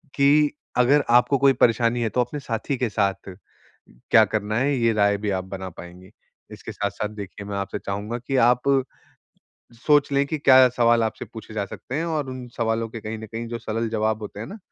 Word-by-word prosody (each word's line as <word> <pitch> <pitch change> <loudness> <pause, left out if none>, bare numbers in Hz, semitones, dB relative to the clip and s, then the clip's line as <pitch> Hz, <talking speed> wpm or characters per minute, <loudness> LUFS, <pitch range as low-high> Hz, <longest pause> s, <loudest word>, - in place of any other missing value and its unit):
कि 145 +1 +4 0.3
अगर 140 +4 +4
आपको 125 +3 +4
कोई 140 0 +4
परेशानी 115 0 +2
है 115 - 0
तो 125 - 0
अपने 125 +5 -4
साथी 120 +1 -3
के 125 -1 -1
साथ 100 -2 -1 0.8
क्या 110 - +7
करना 110 +1 -2
है 140 +3 +1
ये 115 -2 +2
राय 100 -1 +2
भी 105 +1 -3
आप 95 -1 -2
बना 95 0 -7
पाएँगी। 90 +2 -13 0.4
इसके - - -9
साथ-साथ 105 - -3
देखिए 100 0 -8
मैं 100 -1 -4
आपसे 100 0 -4
चाहूँगा 100 +4 -4
कि 130 +3 -4
आप 125 0 +3 1.3
सोच 145 -1 +4
लें 140 0 +2
कि 155 +2 -3
क्या 130 -3 +6
सवाल 115 -1 +4
आपसे 110 - -4
पूछे 110 -1 -11
जा 105 -2 -1
सकते 125 - -9
हैं 160 - -1
और 150 -5 -2
उन 130 -1 -7
सवालों 115 0 -1
के 115 - -7
कहीं 110 +1 -6
न 110 - -8
कहीं 115 +2 -6
जो 120 0 -4
सरल 115 0 -3
जवाब 110 0 -1
होते 105 0 -8
हैं 110 - -5
ना, 210 - -9
115 Hz, 210 wpm, -23 LUFS, 105-130 Hz, 1.3 s, क्या